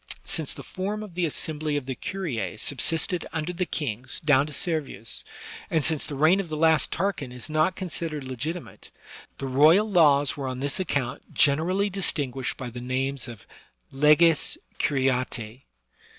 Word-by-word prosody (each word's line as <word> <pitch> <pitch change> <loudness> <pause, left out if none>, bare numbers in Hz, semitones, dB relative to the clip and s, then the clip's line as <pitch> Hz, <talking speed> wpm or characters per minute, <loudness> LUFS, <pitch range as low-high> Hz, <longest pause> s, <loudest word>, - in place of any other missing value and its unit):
Since - - -1
the - - -8
form 205 +3 -4
of 205 -4 -10
the 175 -1 0
assembly 150 0 -2
of 140 - -4
the 130 - -3
curia 145 - -4
subsisted 165 - 0
xmder 165 +3 -2
the 180 0 -1
kings 130 -3 -2
down 145 -1 +4
to - - -7
Servius, 150 - -1 0.5
and 160 -3 +1
since 160 -3 +1
the 145 - -5
reign 160 +7 +4
of 190 -4 -3
the 155 - -3
last 160 -1 +3
Tarquin 170 -8 -1
is 125 +4 -8
not 155 +4 +2
considered 165 -5 -4
legitimate, 150 +7 -6 0.5
the 135 - -5
royal 155 +10 +5
laws 145 -8 +4
were 140 -3 -4
on 130 -1 -4
this 140 +4 -2
account 145 -8 -3
generally 180 +8 +3
distinguished 140 -9 -1
by 125 -2 -6
the 120 +1 -7
name 130 +2 -1
of 115 -4 -10 0.5
leges 150 +3 +4 0.2
curiatce. 130 -4 0
150 Hz, 160 wpm, -26 LUFS, 130-170 Hz, 0.5 s, royal